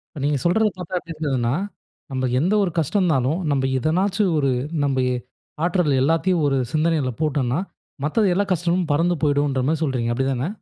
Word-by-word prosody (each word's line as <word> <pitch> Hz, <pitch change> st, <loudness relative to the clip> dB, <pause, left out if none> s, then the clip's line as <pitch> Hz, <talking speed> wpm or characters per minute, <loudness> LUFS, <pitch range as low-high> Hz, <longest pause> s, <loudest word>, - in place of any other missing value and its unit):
இப்ப 145 Hz, -, -6 dB
நீங்க 145 Hz, 0 st, +1 dB
சொல்றத 215 Hz, +6 st, +3 dB
பார்த்தா 180 Hz, 0 st, -4 dB
எப்பிடி 165 Hz, -1 st, -9 dB
இருந்ததுன்னா, 135 Hz, -5 st, 0 dB, 0.6 s
நம்ப 130 Hz, -1 st, -1 dB
எந்த 175 Hz, +8 st, +1 dB
ஒரு 185 Hz, -, -1 dB
கஷ்டம் 165 Hz, +6 st, +1 dB
இருந்தாலும், 155 Hz, -2 st, +1 dB
நம்ப 135 Hz, -2 st, +1 dB
எதனாச்சு 185 Hz, -, +1 dB
ஒரு 140 Hz, -2 st, +2 dB, 0.3 s
நம்ப 135 Hz, -2 st, +1 dB, 0.6 s
ஆற்றல் 175 Hz, -4 st, +2 dB
எல்லாத்தையும் 165 Hz, +4 st, +2 dB
ஒரு 135 Hz, -1 st, +1 dB
சிந்தனையில 155 Hz, -3 st, +1 dB
போட்டன்னா 140 Hz, -4 st, 0 dB, 0.5 s
மத்த 155 Hz, +9 st, +1 dB
எல்லா 200 Hz, +3 st, +1 dB
கஷ்டமும் 175 Hz, 0 st, +1 dB
பறந்து 170 Hz, +4 st, +2 dB
போயுடுன்ற 145 Hz, -2 st, +1 dB
மாரி 160 Hz, -1 st, 0 dB
சொல்றீங்க, 125 Hz, -5 st, -1 dB
அப்பிடி 130 Hz, +2 st, 0 dB
தானே? 130 Hz, +2 st, -1 dB
155 Hz, 165 wpm, -22 LUFS, 135-175 Hz, 0.6 s, சொல்றத